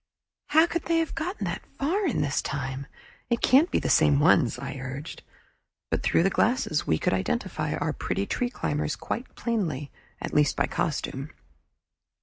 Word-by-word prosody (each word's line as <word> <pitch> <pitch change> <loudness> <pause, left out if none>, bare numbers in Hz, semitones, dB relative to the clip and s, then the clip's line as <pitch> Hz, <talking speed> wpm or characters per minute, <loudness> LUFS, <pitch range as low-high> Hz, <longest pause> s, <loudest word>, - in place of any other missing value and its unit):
"How 315 +2 +6
could 340 -1 -3
they 335 0 +2
have 325 -1 0
got 345 +5 -3
that - - -2 0.2
far 365 +8 +1
in 275 - 0
this 145 0 0
time? 135 0 -4 0.4
It 235 -1 +1
can't 280 +8 +5
be - - +1
the - - -1
same 145 -3 +5
ones," 140 -6 +4
I 135 +2 -5
urged. 135 +4 -6 0.7
But - - +1
through - - +3
the 195 - +2
glasses 220 -9 +1
we 80 - +3
could - - 0
identify 95 -5 -1
our - - -1
pretty 100 - -2
tree 245 - -1
climbers 150 -10 -2
quite 245 - -5
plainly, 165 - -2 0.3
at - - -5
least 150 -1 +3
by 140 - +2
costume. 140 -2 -2
155 Hz, 170 wpm, -27 LUFS, -, 0.7 s, How